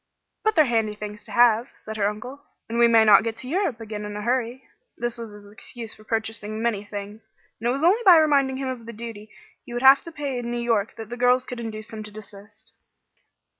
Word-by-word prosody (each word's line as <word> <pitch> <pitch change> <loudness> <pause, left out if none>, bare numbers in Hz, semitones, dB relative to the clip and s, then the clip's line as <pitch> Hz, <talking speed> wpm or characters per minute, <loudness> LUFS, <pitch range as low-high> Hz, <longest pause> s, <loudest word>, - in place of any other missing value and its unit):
"But 435 0 +1
they're 310 -3 +6
handy 225 -4 0
things 210 0 -8
to - - -12
have," 240 0 +4
said 220 - -8
her 205 -1 +2
uncle, 245 +7 -8 0.3
"and 230 +1 -2
we 235 - +7
may 225 -1 +5
not 210 -2 +7
get 225 0 -3
to 250 - -6
Europe 320 - -1
again 215 -2 -6
in 210 0 -6
a 210 - -5
hurry." 245 +2 -1 0.3
This 240 -1 -2
was 230 -2 -6
his 205 0 -13
excuse 230 +1 -8
for 215 - -16
purchasing 220 -1 -3
many 225 -3 -1
things, 205 +1 -8 0.3
and 235 +2 -1
it - - +3
was 275 +4 -2
only 385 +8 +4
by 365 -5 +8
reminding 280 -4 +3
him 270 0 -3
of 245 -3 -6
the 235 - -7
duty 220 -1 -8 0.3
he 240 - -10
would 240 +2 -3
have 270 +1 +8
to 335 - -10
pay 285 -5 -4
in 235 -1 -5
New 240 - -2
York 230 -3 0
that 220 -1 -8
the 240 - -6
girls 250 +1 +3
could 250 -1 -7
induce 215 -1 -7
him 220 - -6
to 210 - -7
desist. 210 0 -13
230 Hz, 240 wpm, -24 LUFS, 215-250 Hz, 0.3 s, by